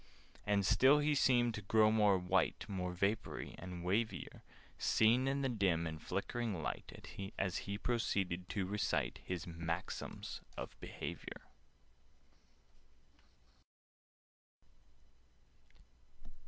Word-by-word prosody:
And 100 -2 +3
still 130 +9 +6
he 150 0 +2
seemed 120 -4 +4
to 110 - -5
grow 110 +2 +4
more 105 -3 +5
white, 90 +1 +1
More 90 -3 -2
vapoury, 100 +5 -1
and 90 -1 -7
wavier— 110 +5 -1 0.4
Seen 120 +4 +4
in 140 +1 0
the - - +2
dim 95 -9 +1
and 80 -1 -5
flickering 115 -7 -2
light, - - -5 0.3
As 95 -1 0
he 100 0 -4
proceeded 95 -6 -1
to 100 -3 -1
recite 100 +2 -1
His 90 -2 -4
"Maxims 85 0 -4 0.2
of - - -6
Behaviour." - - -6
100 Hz, 100 wpm, -36 LUFS, 90-115 Hz, 0.4 s, still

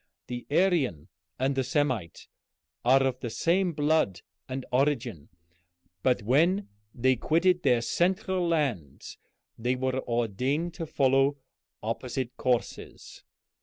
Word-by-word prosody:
The 120 -1 -6
Aryan 145 - +1 0.3
and 135 +2 +1
the 135 -1 0
Semite 130 - -1 0.6
are 135 +2 +5
of 130 -1 -1
the 120 - -4
same 175 +9 +1
blood 150 - +1 0.3
and 130 0 -4
origin, 125 - 0 0.7
but 125 -2 +1
when 170 - +2 0.2
they 130 +2 +2
quitted 175 +7 +2
their 125 -6 +3
central 185 - 0
land 130 - -1 0.6
they 125 +3 0
were 130 0 -1
ordained 125 - -1
to 165 -2 -5
follow 135 0 +2 0.5
opposite 125 +3 -3
courses. 125 -2 -3
130 Hz, 115 wpm, -28 LUFS, 120-160 Hz, 0.7 s, are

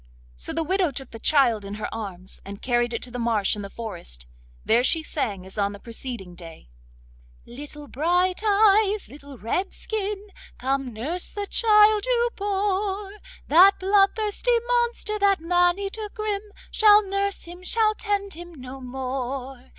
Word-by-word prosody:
So - - -4
the 325 - -1
widow 370 +1 +1
took 270 -2 -8
the 225 - -9
child 240 -6 +3
in 200 +1 -6
her 215 - -4
arms, 190 -4 -6
and 200 +1 -8
carried 240 -1 +1
it 230 - -3
to 250 - -10
the 245 - -5
marsh 225 -4 +1
in 210 - -6
the 200 - -7
forest. 175 - -7 0.4
There 235 +3 +4
she 320 +4 +3
sang 210 -12 -3
as 190 +2 -7
on 200 0 +1
the 205 - -10
preceding 230 -5 -7
day— 165 - -12 0.7
'Little 290 +4 -9
Bright 355 +7 +1
eyes, 420 -1 +4
little 280 -1 -12
Redskin, 395 - -3 0.3
Come 270 0 -1
nurse 290 +11 -3
the 410 -1 -4
child 425 -1 +4
you 480 -1 +2
bore! 400 0 -1 0.4
That 370 +6 +7
bloodthirsty 415 +4 +2
monster, 475 -3 0
That 400 -1 +3
man 350 +2 +3
eater 405 +2 -5
grim, 425 -2 -3 0.2
Shall 420 -1 +6
nurse 395 +1 -1
him, 350 +1 -10
shall 430 +3 +2
tend 405 -2 -2
him 345 +1 -10
no 260 0 -9
more. 260 0 -5
335 Hz, 160 wpm, -25 LUFS, -, 0.7 s, That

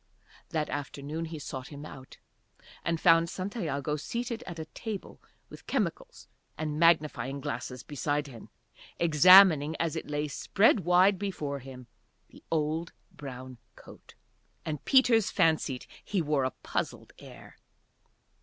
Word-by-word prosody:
That 155 -3 -1 0.3
morning 150 +4 -5
he 160 0 -7
sought 130 -3 -7
him 145 0 -9
out, 130 -3 -12 0.7
and 165 -1 -1
found 165 0 +5
Santiago 160 - -3
seated 235 - -4
at 175 -2 -7
a 160 - -5
table 205 +5 -7 0.3
with - - -14
chemicals - - -3 0.3
and 155 -1 -3
magnifying 150 -5 +2
glasses 125 0 -5
beside 145 +1 -2
him 125 -5 -12 0.5
examining, 165 -1 +7
as 165 -1 -2
it 160 - -5
lay 150 0 -1
spread 200 - +2
wide 185 +2 +4
before 155 -8 -3
him, 130 -1 -11 0.4
the - - -17
old 160 +1 -1 0.2
brown 130 -3 -9 0.2
coat. - - -16 0.5
And 150 -3 -4
Peters 245 -5 +4
fancied 160 -7 +1 0.2
he 200 - -1
wore 150 -4 +1
a - - +1
puzzled - - -4
air. - - -14
155 Hz, 130 wpm, -29 LUFS, 140-180 Hz, 0.7 s, examining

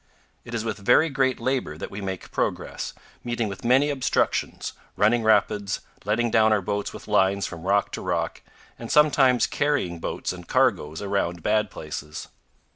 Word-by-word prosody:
It 120 - -7
is 115 -1 -2
with 110 -2 -3
very 125 +10 +4
great 130 -2 +1
labor 125 - -1
that - - -6
we 100 - -6
make 95 -2 -5
progress, - - -2 0.3
meeting 120 -2 -1
with 100 -2 -7
many 135 +5 +4
obstructions, 130 -3 0 0.2
running 110 +3 +4
rapids, 105 -2 +2 0.2
letting 115 +3 +1
down 110 -1 +4
our 105 - +4
boats 100 +2 -2
with - - -11
lines 100 -1 +2
from 85 +1 -7
rock 100 +1 +2
to - - -5
rock, - - -2 0.4
and 115 - -6
sometimes 135 -6 +5
carrying 140 - 0
boats 80 - -3
and 90 -1 -11
cargoes 105 - +1
around 90 -4 -1
bad 105 -1 +2
places. 75 -2 -7
105 Hz, 165 wpm, -25 LUFS, 95-125 Hz, 0.4 s, sometimes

